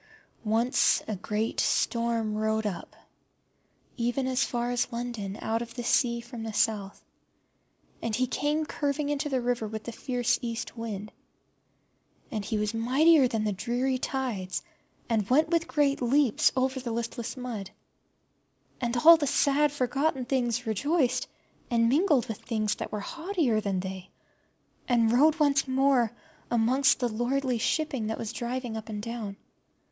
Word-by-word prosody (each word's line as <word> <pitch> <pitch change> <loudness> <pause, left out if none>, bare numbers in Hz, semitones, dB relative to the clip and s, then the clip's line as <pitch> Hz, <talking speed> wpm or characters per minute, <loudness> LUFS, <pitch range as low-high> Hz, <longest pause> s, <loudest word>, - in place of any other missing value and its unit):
Once 230 +3 +2
a 215 - -2
great 210 +3 -2
storm 230 -2 +1
rode 220 0 0
up, 190 -5 -5 1.0
even 245 +2 0
as 260 0 +1
far 240 0 -2
as 245 +1 0
London, 235 -4 -4
out 225 +1 0
of 230 -1 -7
the 240 - -4
sea 235 0 +2
from 240 0 -9
the 225 0 -4
South; 205 -2 -1 1.0
and 225 -2 -1
he 255 +3 +2
came 295 +4 -1
curving 290 0 -2
into 290 +1 -1
the 265 -2 +1
river 240 -2 -1
with 220 0 -6
the 235 - -6
fierce 245 0 0
East 230 -1 -4
wind. 215 -3 -5 1.2
And 215 -4 -3
he 220 +1 -2
was 210 +1 -1
mightier 265 +6 +4
than 225 -3 -1
the 210 - 0
dreary 250 +5 -1
tides, 240 -10 -3 0.4
and 220 -4 0
went 305 +5 +4
with 335 -1 +1
great 285 -3 +1
leaps 255 -1 +3
over 260 +1 +1
the 245 -2 -4
listless 235 +2 -4
mud. 235 -6 -5 1.1
And 240 0 -1
all 330 +6 +9
the 295 -3 -1
sad 285 +1 +3
forgotten 270 0 0
things 245 -2 0
rejoiced, 260 - +1 0.4
and 230 -1 +3
mingled 290 -3 +3
with 225 -3 -5
things 215 -2 -1
that - - -5
were 210 - -3
haughtier 325 - -1
than 195 -3 -1
they, 190 0 -7 0.8
and 230 -2 +3
rode 305 +6 +4
once 285 -2 +3
more 260 -3 +3 0.4
amongst 255 +4 +3
the 245 - +2
lordly 245 +2 -1
shipping 270 -3 0
that 220 - -2
was 225 0 -5
driven 240 0 -3
up 220 0 -7
and 210 -1 -5
down. 225 -4 -5
240 Hz, 155 wpm, -28 LUFS, 220-270 Hz, 1.2 s, all